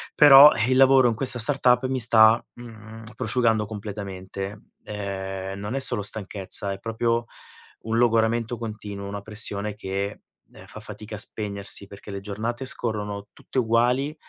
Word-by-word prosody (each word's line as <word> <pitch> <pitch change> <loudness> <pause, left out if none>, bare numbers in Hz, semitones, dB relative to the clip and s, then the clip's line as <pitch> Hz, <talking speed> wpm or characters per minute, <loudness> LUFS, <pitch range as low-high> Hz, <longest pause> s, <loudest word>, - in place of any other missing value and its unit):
però 145 0 +9
il 130 0 +2
lavoro 135 -1 +6
in 115 - -2
questa 125 0 +2
startup 125 0 +3
mi 130 0 -2
sta, 110 0 +5
mhmm, 110 -1 -12
prosciugando 115 -2 +1
completamente, 100 -1 -7 0.2
ehm, 95 -1 -6
non 105 +6 -5
è - - -1
solo 120 -5 +1
stanchezza, 100 -1 -2
è 95 - -6
proprio 115 +1 -1 0.6
un 115 +1 -2
logoramento 115 0 +1
continuo, 105 -3 -7
una 100 0 -6
pressione 105 -1 -1
che, 100 0 -5 0.3
ehm, - - -15
fa - - -10
fatica 110 0 -9
a - - -7
spegnersi, 100 -2 -2
perché 100 +1 -13
le 100 - -5
giornate 110 +6 -5
scorrono 105 -4 -3
tutte 130 - -4
uguali, 125 +5 +1
110 Hz, 145 wpm, -24 LUFS, 100-120 Hz, 0.6 s, però